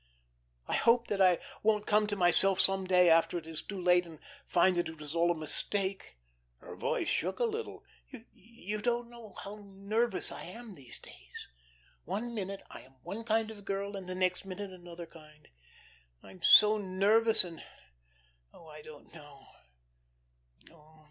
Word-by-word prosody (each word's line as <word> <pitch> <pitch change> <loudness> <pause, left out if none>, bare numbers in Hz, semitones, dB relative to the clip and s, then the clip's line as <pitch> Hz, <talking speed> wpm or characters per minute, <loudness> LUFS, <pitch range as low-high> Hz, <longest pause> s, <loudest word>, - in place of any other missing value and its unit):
I - - -3
hope 235 +1 +3
that 200 -1 -1
I 180 -2 +5 0.2
won't 210 -1 +1
come 210 0 +2
to 205 - -3
myself 190 +1 +4
some 195 0 +1
day, 180 -1 +4
after 165 +1 +3
it 165 - -7
is 160 -1 -6
too 200 -2 -8
late, 180 0 +2
and 160 -2 -12 0.3
find 180 +1 +3
that 175 - -1
it 160 -1 -11
was 150 0 -8
all 170 +1 +2
a 175 - +1
mistake." 190 - +1 0.4
Her - - -12
voice - - -2
shook 185 +3 -1
a - - -1
little. 455 0 -5 0.5
"You 215 -2 -8
don't 240 +1 -2
know 235 -4 -13
how 210 +1 -9
nervous 200 +2 -2
I - - -8
am 225 +4 -9
these 135 -7 -10
days. - - -13 0.5
One 235 - -4
minute 195 -2 -5
I - - -10
am 130 +1 -19
one 225 +3 -6
kind 225 -1 0
of 205 -2 -12
girl, 200 +1 -4
and 190 -2 -8
the 185 - -4
next 185 0 0
another 185 -3 -9
kind. 155 -2 -18 0.8
I'm 185 - -15
so 215 +4 +7
nervous 210 +4 +5
and 170 -3 -10 0.9
oh, - - -16
I 150 0 -11
don't 150 -1 -15
know. 145 -4 -15
190 Hz, 165 wpm, -31 LUFS, 170-210 Hz, 0.9 s, so